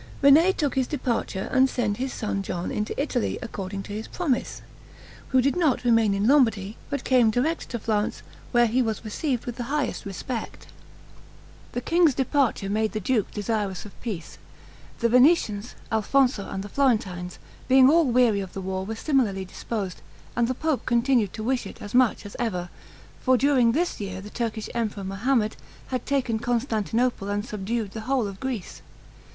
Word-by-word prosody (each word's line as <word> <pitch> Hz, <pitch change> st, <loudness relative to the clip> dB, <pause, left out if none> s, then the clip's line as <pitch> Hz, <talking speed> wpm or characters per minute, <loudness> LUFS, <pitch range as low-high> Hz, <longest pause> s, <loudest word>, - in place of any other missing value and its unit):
René 310 Hz, +7 st, +7 dB
took 290 Hz, -5 st, 0 dB
his 260 Hz, -2 st, +1 dB
departure, 235 Hz, -8 st, -2 dB
and 265 Hz, 0 st, +4 dB
send 215 Hz, -6 st, -1 dB
his 260 Hz, +1 st, -2 dB
son 210 Hz, -3 st, -2 dB
John 180 Hz, -2 st, -4 dB
into 210 Hz, +4 st, -3 dB
Italy, 275 Hz, -4 st, -1 dB
according 195 Hz, -4 st, -5 dB
to 205 Hz, -, -8 dB
his 215 Hz, +2 st, -5 dB
promise, 300 Hz, -9 st, -2 dB, 0.6 s
who 260 Hz, -1 st, +3 dB
did 275 Hz, -, +2 dB
not 315 Hz, -9 st, +2 dB
remain 225 Hz, -4 st, +3 dB
in 200 Hz, +2 st, +1 dB
Lombardy, 225 Hz, -7 st, +3 dB
but 280 Hz, -2 st, -3 dB
came 250 Hz, -4 st, +4 dB
direct 270 Hz, +9 st, -1 dB
to 240 Hz, -, -3 dB
Florence, 210 Hz, -1 st, -1 dB, 0.3 s
where 240 Hz, -1 st, +5 dB
he 240 Hz, +3 st, +2 dB
was 220 Hz, -2 st, -2 dB
received 245 Hz, +3 st, -2 dB
with 240 Hz, -1 st, -5 dB
the 240 Hz, -, -3 dB
highest 285 Hz, +2 st, -2 dB
respect. 225 Hz, +4 st, -5 dB, 1.1 s
The 245 Hz, -, -2 dB
king's 330 Hz, -3 st, +3 dB
departure 265 Hz, -6 st, +1 dB
made 215 Hz, +2 st, 0 dB
the 215 Hz, -, -1 dB
duke 215 Hz, +1 st, 0 dB
desirous 205 Hz, -2 st, -2 dB
of 210 Hz, -, -9 dB
peace. 200 Hz, -9 st, -6 dB, 0.6 s
The 235 Hz, -, +4 dB
Venetians, 245 Hz, -4 st, +3 dB, 0.2 s
Alfonso, 225 Hz, 0 st, +2 dB
and 190 Hz, -, -4 dB
the 205 Hz, -, -8 dB
Florentines, 195 Hz, -9 st, 0 dB, 0.3 s
being 260 Hz, 0 st, +7 dB
all 325 Hz, +3 st, +5 dB
weary 240 Hz, -4 st, +3 dB
of 190 Hz, -2 st, -6 dB
the -, -, -5 dB
war, 190 Hz, 0 st, -3 dB
were 220 Hz, +3 st, -4 dB
similarly 220 Hz, -8 st, +1 dB
disposed; 195 Hz, 0 st, -5 dB, 0.3 s
and 235 Hz, -1 st, +2 dB
the 255 Hz, -, -1 dB
pope 310 Hz, -4 st, -1 dB
continued 235 Hz, -4 st, +2 dB
to 220 Hz, -, -5 dB
wish 255 Hz, +2 st, 0 dB
it -, -, -11 dB
as 205 Hz, -, -8 dB
much 250 Hz, -4 st, +3 dB
as 205 Hz, -, -9 dB
ever; 180 Hz, -7 st, -2 dB, 0.5 s
for 255 Hz, -1 st, +4 dB
during 250 Hz, -3 st, +3 dB
this 345 Hz, +5 st, 0 dB
year 190 Hz, -2 st, -4 dB
the 205 Hz, +2 st, -10 dB
Turkish 225 Hz, -2 st, -3 dB
emperor, 215 Hz, -4 st, -2 dB
Mohammed, 215 Hz, +3 st, 0 dB, 0.3 s
had 255 Hz, -2 st, -3 dB
taken 260 Hz, -5 st, 0 dB
Constantinople 235 Hz, -2 st, 0 dB
and 205 Hz, +1 st, -1 dB
subdued 210 Hz, 0 st, -3 dB
the 220 Hz, -, -6 dB
whole 265 Hz, -4 st, +2 dB
of 195 Hz, -1 st, -6 dB
Greece. 250 Hz, -8 st, -5 dB
230 Hz, 175 wpm, -25 LUFS, 205-260 Hz, 1.1 s, René